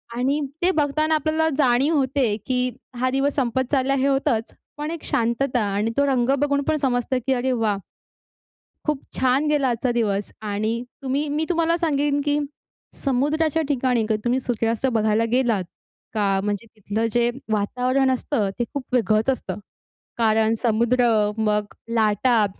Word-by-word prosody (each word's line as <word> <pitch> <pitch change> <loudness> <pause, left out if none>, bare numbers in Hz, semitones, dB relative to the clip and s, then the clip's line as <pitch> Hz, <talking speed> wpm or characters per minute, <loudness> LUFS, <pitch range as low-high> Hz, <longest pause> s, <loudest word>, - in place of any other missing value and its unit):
आणि 270 +5 +1 0.2
ते 360 +2 +4
बघताना 310 0 +1
आपल्याला 315 +1 +1
जाणीव 275 +3 +3
होते 260 -5 +1
की, 250 -1 +1 0.3
हा 255 0 +2
दिवस 270 +2 +1
संपत 260 -1 0
चाललाय, 275 0 +2
हे 270 +1 +2
होतंच. 260 -5 0 0.2
पण 300 +2 -3
एक 335 -2 -6
शांतता 240 +2 0 0.2
आणि 215 +3 0
तो 280 - +4
रंग 260 -2 +1
बघून 285 0 +1
पण 310 - +2
समजतं 255 -2 0
की 265 - +3
अरे 255 +1 0
वाह! 220 -4 +1 1.1
खूप 300 -3 0 0.2
छान 260 +3 +2
गेला 295 -3 +2
आजचा 240 +1 0
दिवस 205 -4 -1
आणि 215 +3 -2 0.2
तुम्ही 275 +3 -1
मी 305 +2 0
तुम्हाला 335 -1 +2
सांगेन 290 -3 +1
की 290 0 +2 0.6
समुद्राच्या 295 +4 +1
ठिकाणी 250 -5 +1
कधी 215 - +2
तुम्ही 245 +2 +2
सूर्यास्त 230 -1 -1
बघायला 220 0 +2
गेलात 240 -6 +2 0.5
का, 200 -3 +1
म्हणजे 205 +2 -2
तिथलं 215 +2 -2
जे 240 +1 +2 0.2
वातावरण 250 +6 +1
असतं 240 -5 -1
ते - - +2
खूप 280 - -3
वेगळंच 225 0 +2
असतं. 200 -7 -2 0.6
कारण 220 -1 +3
समुद्र, 235 +1 +2 0.3
मग 210 -1 0 0.2
लाटा, 220 +1 +3
255 Hz, 150 wpm, -23 LUFS, 225-280 Hz, 1.1 s, ते